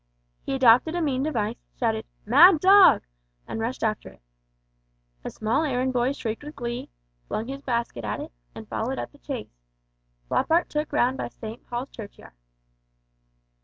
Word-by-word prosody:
He 270 - -3
adopted 260 +5 +5
a 350 - 0
mean 265 -4 0
device, 235 -6 -1 0.2
shouted 220 -2 -1 0.2
"Mad 310 - +7
dog!" 390 +3 +7 0.4
and - - -5
rushed 230 +3 -3
after 215 -2 -1
it. 65 -1 -20 1.0
A - - -4
small 230 +8 0
errand 260 -3 0
boy 250 +1 +1
shrieked 225 -2 -5
with 300 +1 -9
glee, 240 0 -5 0.4
flung 220 - -3
his 275 +1 -6
basket 235 - -2
at 105 - -3
it, - - -7 0.2
and - - -9
followed - - -3
up - - -5
the - - -21
chase. - - -7 0.7
Floppart 330 - +1
took 300 0 -2
round 255 +2 +2
by - - -3
St. 225 0 -9
Paul's 245 +3 -4
Churchyard. 210 - -11
245 Hz, 160 wpm, -25 LUFS, 225-285 Hz, 1.0 s, Mad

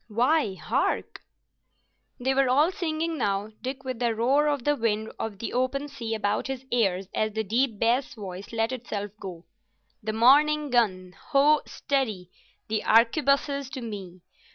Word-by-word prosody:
—Why, 235 0 +2
hark!" - - -1 1.0
They 260 +2 +1
were 270 -1 +3
all 295 +7 +4
singing 325 -2 -2
now, 205 -1 -1
Dick 265 +1 -5
with 255 -3 -4
the 235 -2 +1
roar 270 +7 +3
of 290 -4 0
the 295 +2 +2
wind 220 -3 -1
of 220 -3 -4
the 230 - -5
open 255 +3 0
sea 230 -5 -4
about 210 +1 -1
his 265 -1 -5
ears 195 -6 +1
as 215 -1 0
the 220 +1 -1
deep 230 +2 0
bass 240 +5 +1
voice 195 -2 -8
let 225 +1 0
itself 215 -5 -4
go. 180 -3 -8 0.6
"The 215 0 -3
morning 290 +5 +4
gun—Ho, 240 +7 +2
steady! 220 - -2 0.4
the 215 0 -1
arquebuses 275 +4 +3
to 260 - -5
me! 195 -6 -7
235 Hz, 155 wpm, -26 LUFS, 210-275 Hz, 1.0 s, all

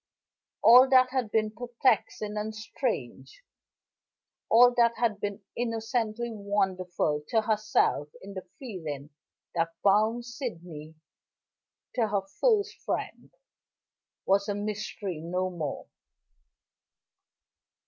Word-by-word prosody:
All 250 +3 +8
that 255 -1 +5
had 255 -4 -1
been 215 0 +1
perplexing 235 -3 0
and 215 +1 -3
strange, 215 - -4 1.1
all 245 +2 +7
that 235 -1 +3
had 220 -4 0
been 205 0 -4
innocently 230 0 -2
wonderful 185 -7 -1
to 225 -2 +2
herself 215 -8 +1
in 200 +1 -10
the 190 - -5 0.2
feeling 160 - -6 0.4
that 165 -1 -1
bound 215 +4 +3
Sydney 175 - -7 1.0
to 235 -3 +1
her 200 -2 0 0.2
first 435 -3 +2
friend, - - -4 1.0
was 200 +1 +2
a 205 - 0
mystery 205 -3 -4
no 180 +3 -2
more. 155 -5 -4
215 Hz, 100 wpm, -28 LUFS, 185-240 Hz, 1.1 s, All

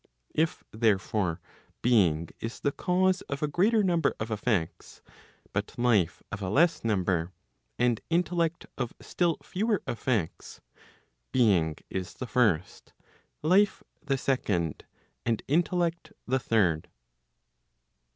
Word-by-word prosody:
If 160 +1 0
therefore 105 -5 +1 0.4
being 85 -10 +3
is 115 +1 -6
the 140 - +1
cause 185 +4 +1
of 140 +1 -3
a - - +2
greater 210 +8 +3
number 170 -5 +2
of 110 +1 -4
effects, 105 -6 -2 0.5
but 100 +1 -3
life 110 -9 +2
of 100 - -5
a 95 - -2
less 165 - +3
number, 95 -5 0 0.4
and 120 -2 +2
intellect 170 -1 0
of 120 -2 -3
still 170 -3 0
fewer 210 +2 -1
effects, 115 -7 -2 0.7
being 95 -11 +3 0.2
is 95 -1 -4
the 130 - -5
first, 110 -10 0 0.5
life 195 +6 +3 0.2
the 140 -3 0
second, 100 - -1 0.4
and 115 -2 -1
intellect 170 +2 0
the 130 +2 +1
third. 95 -10 +1
120 Hz, 115 wpm, -28 LUFS, -, 0.7 s, being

